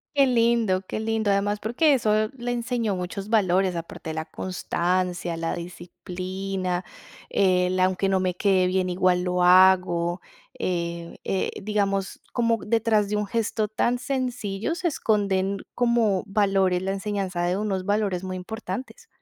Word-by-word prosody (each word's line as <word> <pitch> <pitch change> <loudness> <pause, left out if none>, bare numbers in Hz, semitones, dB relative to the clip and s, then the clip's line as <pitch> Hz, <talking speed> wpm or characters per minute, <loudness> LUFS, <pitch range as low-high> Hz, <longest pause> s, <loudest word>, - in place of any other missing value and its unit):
Qué 280 -1 +6
lindo, 230 -6 +2
qué - - -3
lindo. 220 -1 0
Además, 205 +1 +1
porque 255 +9 +2
eso, 215 -4 +2
le 245 -1 -3
enseñó 235 -3 -1
muchos 190 +3 -5
valores, 190 -4 +2
aparte 165 -1 -6
de 160 - -4
la 160 0 -3
constancia, 180 -1 -2
la 165 0 -2
disciplina, 180 +1 -4 0.5
el 185 -1 +2
aunque 185 +1 +2
no 190 -1 +2
me 185 -1 0
quede 190 -1 +3
bien 185 0 0
igual 180 0 +2
lo 180 0 0
hago. 180 -1 +5 0.4
Eh, 170 -1 -3
eh, 190 - -1
digamos, 200 -2 -1
como 230 -1 +2
detrás 220 -2 +2
de 210 - -2
un 210 0 -1
gesto 220 0 -1
tan 235 +3 0
sencillo 245 -3 -2
se 360 0 -1
esconden 200 - 0 0.2
como 235 -6 +2
valores, 195 -3 +2
la 190 +1 -1
enseñanza 195 -3 -2
de 175 +1 +1
unos 195 -3 -2
valores 205 -3 0
muy 185 0 -4
importantes. 220 +4 -6
195 Hz, 145 wpm, -25 LUFS, 180-215 Hz, 0.5 s, Qué